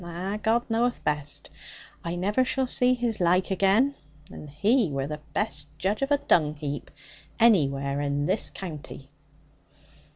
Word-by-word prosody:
Ah, 180 +4 -4
God 230 +3 +1
knoweth 235 +2 0
best. 150 -1 -3 0.5
I 170 +1 -3
never 205 +8 +1
shall 260 +1 0
zee 250 0 +2
his 235 -3 -2
laike 180 +2 +2
again. 200 +9 +3 0.4
And 150 - -9
he 205 - +2
were 135 -1 -2
the 150 +1 -6
best 215 - -2
judge 200 +5 -1
of 275 - 0
a 290 - +4
dung 155 - +2
heap 145 -1 -5 0.5
anywhere 140 -11 +3
in 145 0 -1
this 190 +6 0
county.' 150 -6 -8
185 Hz, 150 wpm, -26 LUFS, 150-230 Hz, 0.5 s, a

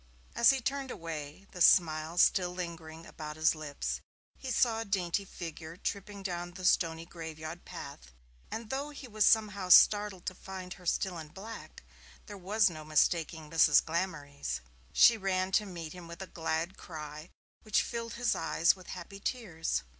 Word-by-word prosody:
As 235 - +6
he 270 - +4
turned 270 +1 -2
away, 160 -2 -6
the 180 - -8
smile 160 -1 +4
still 180 0 +4
lingering 165 -2 -7
about 150 -1 -7
his 155 +1 +3
lips, 150 -3 -4 0.4
he 265 - -6
saw 235 -3 +2
a - - -1
dainty 195 -1 0
figure 165 -2 -8
tripping 200 +1 -4
down 175 -2 -4
the 185 -1 -6
stony 165 -3 +2
graveyard 160 0 -8
path, - - -9 0.4
and 225 -1 -6
though 275 +2 -2
he 285 -3 -9
was 215 -2 +3
somehow 205 -4 +3
startled 205 0 +6
to 185 - -2
find 185 0 -8
her 180 -2 -12
still 180 0 0
in 155 - -8
black, 205 +8 -10 0.4
there 205 - -9
was 200 +3 +2
no 155 -4 -5
mistaking 155 +1 +1
Mrs. 160 -3 +6
Glamorys. 145 - -3 0.3
She 235 - +7
ran 190 -1 0
to 210 +2 +2
meet 170 -4 -7
him 180 -2 -10
with 170 +3 -7
a 190 - -13
glad 165 +2 -2
cry, 155 0 -8 0.3
which 215 -1 +2
filled 230 -1 -4
his 235 0 +1
eyes 170 +3 +2
with 185 -2 -15
happy 185 +2 -8
tears. 165 - -2
180 Hz, 170 wpm, -31 LUFS, 160-200 Hz, 0.4 s, She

